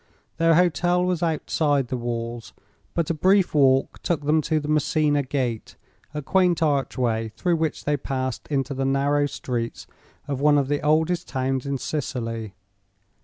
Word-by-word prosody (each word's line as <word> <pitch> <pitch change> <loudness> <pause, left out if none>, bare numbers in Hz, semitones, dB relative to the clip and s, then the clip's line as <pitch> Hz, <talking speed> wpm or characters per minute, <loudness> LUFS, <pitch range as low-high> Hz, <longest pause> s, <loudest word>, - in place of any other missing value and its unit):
Their 165 0 +4
hotel 180 +1 +2
was 180 -2 -1
outside 150 -4 0
the 130 - -2
walls, 120 -1 -4 0.4
but 170 -1 0
a - - +1
brief 190 +4 +3
walk 135 -2 +3
took 170 -5 -1
them 155 +1 +3
to 155 +1 0
the 150 - -6
Messina 150 -1 +2
Gate, 130 -4 -3 0.4
a 150 0 -5
quaint 180 +1 +2
archway 125 -6 0
through 175 -2 +1
which 160 -1 -2
they 150 0 +1
passed 130 -2 -4
into 140 -1 -1
the 135 0 -2
narrow 140 +2 +2
streets 120 -4 -4 0.4
of 140 -2 -3
one 150 0 +5
of 140 -1 0
the 145 0 0
oldest 160 +3 +1
towns 130 0 -2
in 140 0 -1
Sicily. 115 - -4
145 Hz, 160 wpm, -24 LUFS, 130-160 Hz, 0.4 s, one